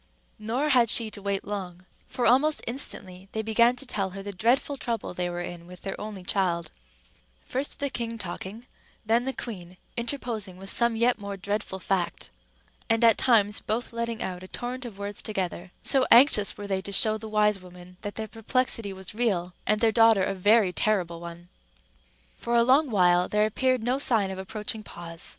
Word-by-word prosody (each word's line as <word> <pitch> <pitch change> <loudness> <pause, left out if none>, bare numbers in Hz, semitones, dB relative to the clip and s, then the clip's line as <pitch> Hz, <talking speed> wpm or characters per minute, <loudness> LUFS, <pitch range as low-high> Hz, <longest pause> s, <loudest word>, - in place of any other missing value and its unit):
Nor 240 +8 -1
had 245 -5 +4
she 225 -1 +4
to 205 - -7
wait 200 0 -2
long, 185 -3 -6 0.2
for 245 - -2
almost 285 +6 +3
instantly 195 -7 -3
they 220 - -2
began 235 +3 +3
to 250 - -5
tell 195 -6 -2
her 195 - -6
the 200 - -5
dreadful 240 +8 +1
trouble 235 -7 -4
they 180 0 -2
were 175 0 -4
in 175 -1 -8
with 180 0 -13
their 195 - -5
only 210 -3 -7
child; 180 -3 -1 0.7
first 270 +3 -3
the 285 - -1
king 230 -2 -4
talking, 200 +3 -6 0.4
then 230 +3 +2
the 265 - 0
queen 185 -8 -8 0.2
interposing 235 -6 0
with 195 +1 -1
some 235 -1 +2
yet 235 +1 +2
more 200 -1 -6
dreadful 200 0 -3
fact, 185 - -2 0.6
and 225 +1 +2
at 230 -2 +7
times 210 -5 +3
both 230 +2 -3
letting 235 0 -3
out 180 -1 -5
a 185 - -10
torrent 245 +4 -5
of 220 -5 -8
words 200 0 -5
together, 185 -3 -3
so 265 -2 +3
anxious 235 -5 +7
were 205 - -7
they 195 -1 -1
to 200 - -7
show 215 +2 +5
the 220 0 -8
wise 210 -1 +2
woman 180 0 -14
that 205 -2 -6
their 220 0 -4
perplexity 225 -1 -2
was 190 0 -10
real, 195 -6 0
and 215 0 +2
their 225 -1 +4
daughter 225 -3 +5
a - - 0
very 205 0 +3
terrible 180 -5 0
one. 170 0 -10 0.9
For 235 - -1
a 235 - +5
long 270 +4 +4
while 180 -4 +3
there 210 0 +2
appeared 255 +2 0
no 250 +3 0
sign 220 -8 +2
of 190 - -6
approaching 210 +3 -3
pause. 170 -4 -6
210 Hz, 190 wpm, -26 LUFS, 190-235 Hz, 0.9 s, at